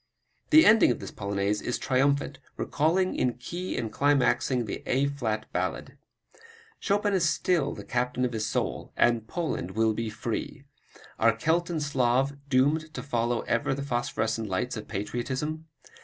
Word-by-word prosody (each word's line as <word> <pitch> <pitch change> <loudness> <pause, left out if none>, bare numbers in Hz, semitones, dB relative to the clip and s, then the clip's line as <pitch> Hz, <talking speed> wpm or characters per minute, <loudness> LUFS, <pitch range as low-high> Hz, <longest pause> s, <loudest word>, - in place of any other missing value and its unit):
The 315 +1 +8
ending 220 -1 +7
of 120 - 0
this - - -7
Polonaise 100 +1 -1
is 125 - -2
triumphant, 140 +1 +1 0.2
recalling 175 +5 +1
in 125 -1 +1
key 170 +10 -5
and 115 -3 -3
climaxing 130 -3 +2
the - - -5
A 135 +2 +2
flat 115 -7 -2
Ballade. - - -3 0.8
Chopin 205 +1 +1
is 175 -4 +3
still 155 -3 +1
the - - -8
captain 125 0 -1
of 125 - -3
his 110 -1 -1
soul - - -2
and 115 -2 +2
Poland 110 - -3
will 110 0 +3
be 115 +1 -3
free! 115 +4 -4 0.6
Are - - +4
Celt 165 +2 +1
and 160 -3 -1
Slav 135 0 +1
doomed 145 +4 +2
to - - -5
follow 120 -3 0
ever 120 +3 0
the 140 - -4
phosphorescent 115 -4 -1
lights 125 +7 -1
of 110 - -7
patriotism? 130 +9 -3
130 Hz, 155 wpm, -27 LUFS, 115-150 Hz, 0.8 s, The